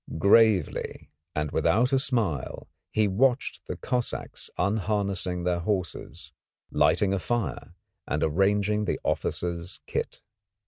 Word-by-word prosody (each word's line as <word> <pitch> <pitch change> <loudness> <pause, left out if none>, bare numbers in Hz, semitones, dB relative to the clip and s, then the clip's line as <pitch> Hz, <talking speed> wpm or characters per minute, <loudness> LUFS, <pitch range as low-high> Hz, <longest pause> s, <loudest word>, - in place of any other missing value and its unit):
Gravely 100 -1 +3 0.2
and 75 -1 -1
without 125 +6 +2
a 135 - +5
smile 105 - -1 0.2
he 110 -1 +2
watched 125 +7 +1
the - - -3
Cossacks 125 -2 -3
unharnessing 100 -2 0
their 90 -1 +1
horses, 90 -3 -3 0.4
lighting 100 -1 +3
a 100 - 0
fire 120 +4 -3 0.3
and 75 0 0
arranging 100 +5 +2
the - - -1
officers' 85 0 -1
kit. - - -3
100 Hz, 110 wpm, -27 LUFS, 90-110 Hz, 0.4 s, a